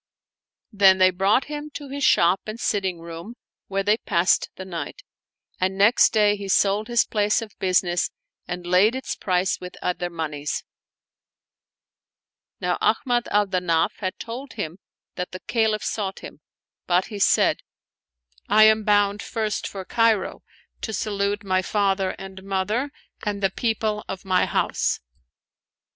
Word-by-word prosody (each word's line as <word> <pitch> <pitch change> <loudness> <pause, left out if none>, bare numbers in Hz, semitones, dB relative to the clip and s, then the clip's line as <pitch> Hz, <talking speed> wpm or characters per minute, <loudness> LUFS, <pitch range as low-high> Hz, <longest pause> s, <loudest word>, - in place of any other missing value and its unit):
Then 195 -2 +6
he 185 0 +6
brought 195 +7 +2
him 295 0 -6
to 290 - -6
his 280 +1 -4
shop 175 -3 +4
and 215 +2 -6
sitting 190 -7 -1
room 170 +7 -8 0.3
where 195 0 -1
they 210 +2 +3
passed 175 -4 +1
the 190 - -8
night; 170 -6 -6 0.6
and 190 +1 0
next 205 +4 +5
day 210 -2 +3
he 200 -1 -7
sold 200 +2 +2
his 240 -1 +3
place 210 -1 +1
of 225 -2 -7
business 180 -2 +1 0.4
and 180 0 -5
laid 185 +7 +4
its 260 - -3
price 185 0 0
with 180 0 -8
other 180 0 -2
moneys. 150 -3 -4 2.0
Now - - -1
Ahmad 245 -3 +1
al 205 0 +3
Danaf 180 -4 0
had 185 -2 -4
told 250 +4 -7
him 175 -4 -5 0.4
that 180 0 -4
the 185 - -6
Caliph 220 -2 0
sought 195 -3 -3
him; - - -10 0.5
but 180 +1 +3
he 205 - -5
said, - - +3 0.5
" - - -36
I 215 - +6
am 220 0 +5
bound 205 -1 +2
first 220 -2 -2
for 190 -2 -7
Cairo, 225 -3 +1 0.4
to 220 - -4
salute 205 0 -1
my 185 -1 +1
father 195 -1 0
and 190 0 -9
mother 195 +7 -1 0.3
and 205 -1 -3
the 195 - +3
people 220 -1 -1
of 190 0 -6
my 185 -1 +2
house." - - 0
195 Hz, 150 wpm, -24 LUFS, 185-215 Hz, 2.0 s, Then